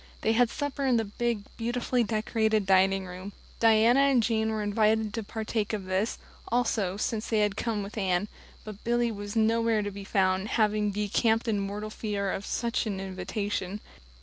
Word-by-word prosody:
They 220 Hz, -, +2 dB
had 235 Hz, +1 st, +4 dB
supper 285 Hz, +2 st, -3 dB
in 250 Hz, -2 st, +4 dB
the 225 Hz, -, 0 dB
big, 225 Hz, +1 st, -2 dB
beautifully 240 Hz, +1 st, 0 dB
decorated 220 Hz, -1 st, 0 dB
dining 190 Hz, 0 st, +3 dB
room; 185 Hz, +2 st, -8 dB, 0.3 s
Diana 225 Hz, +3 st, +5 dB
and 275 Hz, -4 st, +4 dB
Jane 220 Hz, -1 st, +1 dB
were 215 Hz, -1 st, -1 dB
invited 215 Hz, +1 st, +2 dB
to 225 Hz, -, -2 dB
partake 220 Hz, 0 st, -3 dB
of 205 Hz, -3 st, -3 dB
this, 190 Hz, +4 st, -1 dB, 0.3 s
also, 220 Hz, -5 st, 0 dB
since 215 Hz, +1 st, -2 dB
they 220 Hz, -2 st, +2 dB
had 205 Hz, -1 st, +1 dB
come 220 Hz, -3 st, -2 dB
with 200 Hz, +2 st, -8 dB
Anne, 190 Hz, 0 st, +1 dB, 0.4 s
but 215 Hz, -1 st, -9 dB
Billy 240 Hz, 0 st, +1 dB
was 205 Hz, 0 st, -6 dB
nowhere 225 Hz, -1 st, +2 dB
to 205 Hz, -, -3 dB
be 200 Hz, 0 st, -8 dB
found, 190 Hz, 0 st, +1 dB
having 210 Hz, -1 st, +2 dB
decamped 215 Hz, +3 st, +1 dB
in 215 Hz, -3 st, +1 dB
mortal 205 Hz, +2 st, -4 dB
fear 205 Hz, -3 st, -2 dB
of 195 Hz, -, -4 dB
some -, -, -2 dB
such 235 Hz, -, 0 dB
invitation. 195 Hz, 0 st, -3 dB
215 Hz, 175 wpm, -28 LUFS, 200-225 Hz, 0.4 s, Diana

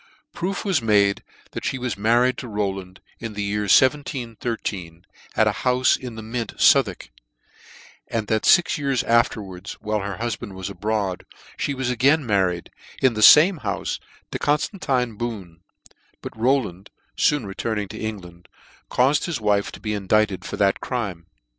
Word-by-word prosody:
Proof 195 Hz, +5 st, -3 dB
was 185 Hz, -9 st, +2 dB
made 100 Hz, -3 st, +2 dB, 0.3 s
that -, -, -6 dB
flie 130 Hz, -, -1 dB
was 125 Hz, -5 st, -3 dB
married 120 Hz, +5 st, +3 dB
to 125 Hz, -, -7 dB
Row 105 Hz, -3 st, -1 dB
land, 95 Hz, -1 st, -10 dB, 0.2 s
in 115 Hz, -2 st, -6 dB
the 105 Hz, 0 st, -3 dB
year 105 Hz, 0 st, -1 dB
1713, 115 Hz, -, 0 dB, 0.3 s
at -, -, +4 dB
a -, -, +3 dB
houfe 125 Hz, 0 st, +3 dB
in 125 Hz, -3 st, -8 dB
the 110 Hz, -, -7 dB
Mint, 115 Hz, 0 st, -5 dB
Southwark, -, -, +3 dB, 1.0 s
^and 115 Hz, -2 st, -1 dB
that 110 Hz, +1 st, 0 dB
fix 175 Hz, -3 st, +4 dB
years 135 Hz, -4 st, 0 dB
afterwards, 105 Hz, -6 st, 0 dB
while 105 Hz, 0 st, -3 dB
her 100 Hz, -1 st, -5 dB
hufband 115 Hz, -3 st, -4 dB
was 95 Hz, +1 st, -5 dB
abroad,, 105 Hz, -2 st, -2 dB, 0.4 s
fhe 140 Hz, -, -1 dB
was 130 Hz, -1 st, -1 dB
again 135 Hz, +5 st, +3 dB
married, 95 Hz, -5 st, 0 dB, 0.3 s
in 130 Hz, -2 st, +3 dB
the 110 Hz, -, -3 dB
fame 160 Hz, -, +8 dB
houfe, 100 Hz, -5 st, -3 dB, 0.3 s
to -, -, -3 dB
Conftantine 140 Hz, -, 0 dB
Boone 100 Hz, -9 st, -5 dB
j -, -, -29 dB, 0.3 s
but -, -, -7 dB
Rowland, 110 Hz, -6 st, 0 dB, 0.3 s
foon 145 Hz, -6 st, +2 dB
returning 105 Hz, +1 st, -3 dB
to -, -, -8 dB
England, 90 Hz, -5 st, -7 dB, 0.4 s
caufed 135 Hz, +4 st, +2 dB
his 170 Hz, -7 st, -3 dB
wife 105 Hz, -2 st, +1 dB
to -, -, -11 dB
be 105 Hz, -1 st, -3 dB
indicted 100 Hz, -1 st, +1 dB
for -, -, -6 dB
this 100 Hz, -1 st, +3 dB
crime. 100 Hz, -9 st, -4 dB
110 Hz, 160 wpm, -23 LUFS, 100-125 Hz, 1.0 s, fame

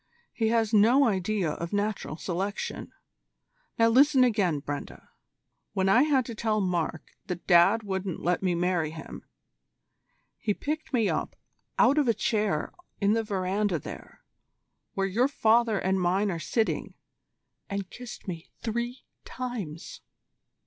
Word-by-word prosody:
He 225 Hz, -, 0 dB
has 225 Hz, -1 st, +1 dB
no 235 Hz, +7 st, +6 dB
idea 195 Hz, -4 st, 0 dB
of 170 Hz, +5 st, -5 dB
Natural 205 Hz, -6 st, -2 dB
Selection. 190 Hz, +4 st, -4 dB, 0.9 s
Now 230 Hz, 0 st, +5 dB
listen 265 Hz, +2 st, +5 dB
again, 200 Hz, -11 st, +2 dB
Brenda.. 145 Hz, +1 st, -7 dB, 0.6 s
When 190 Hz, -2 st, +1 dB
I 230 Hz, +6 st, +6 dB
had 275 Hz, -4 st, +3 dB
to 235 Hz, -, -6 dB
tell 215 Hz, -1 st, 0 dB
Mark 175 Hz, -4 st, -2 dB, 0.2 s
that 180 Hz, -3 st, -5 dB
Dad 195 Hz, +5 st, +5 dB
wouldn't 190 Hz, -3 st, -3 dB
let 175 Hz, +1 st, 0 dB
me 185 Hz, -2 st, +1 dB
marry 175 Hz, -2 st, 0 dB
him, 160 Hz, 0 st, -9 dB, 1.2 s
he 210 Hz, -2 st, -1 dB
picked 310 Hz, +2 st, -4 dB
me 230 Hz, -6 st, +2 dB
up -, -, -2 dB, 0.4 s
out 280 Hz, +4 st, +5 dB
of 285 Hz, -, +2 dB
a 230 Hz, -, +3 dB
chair 210 Hz, -7 st, 0 dB, 0.3 s
in 205 Hz, 0 st, +3 dB
the 225 Hz, -, +2 dB
verandah 195 Hz, -2 st, 0 dB
there, 145 Hz, -, -10 dB, 0.7 s
where 195 Hz, -, +1 dB
your 225 Hz, +7 st, +2 dB
father 230 Hz, -4 st, +3 dB
and 190 Hz, 0 st, 0 dB
mine 190 Hz, +3 st, +1 dB
are 170 Hz, -, -3 dB
sitting, 220 Hz, +7 st, -1 dB, 0.7 s
and 200 Hz, -2 st, -4 dB
kissed 245 Hz, -4 st, -10 dB
me 170 Hz, -3 st, -6 dB
three 235 Hz, +2 st, -3 dB, 0.2 s
times." 220 Hz, -11 st, -6 dB
205 Hz, 140 wpm, -27 LUFS, 180-230 Hz, 1.2 s, no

